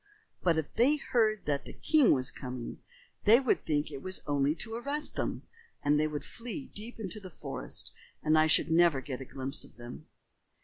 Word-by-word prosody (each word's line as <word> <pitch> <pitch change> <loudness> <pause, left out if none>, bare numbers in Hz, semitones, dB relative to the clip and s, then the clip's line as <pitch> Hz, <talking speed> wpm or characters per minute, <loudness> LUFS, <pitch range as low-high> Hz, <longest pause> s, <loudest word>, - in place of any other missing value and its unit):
But 170 -3 +3
if 160 -2 -2
they 255 +6 +4
heard 220 -7 +1
that 145 -1 -1
the - - -9
king 305 -6 +4
was 130 0 +2
coming, 125 -2 -6 0.5
they 225 +4 +8
would 260 -3 +1
think 150 -1 0
it 140 -2 -6
was 185 0 -3
only 145 +1 +1
to 225 +5 -3
arrest 280 +6 -1
them, - - -2 0.4
and 145 +1 +3
they 155 - +2
would 150 -1 -5
flee 245 +4 -6
deep 225 +3 -5
into 205 -1 -4
the 190 -2 -9
forest - - -5 0.3
and 155 0 +4
I 155 0 +5
should 160 - +5
never 165 -4 +5
get 130 0 -6
a - - -6
glimpse 135 +2 -4
of - - -16
them." 120 0 -10
160 Hz, 200 wpm, -31 LUFS, 145-225 Hz, 0.5 s, they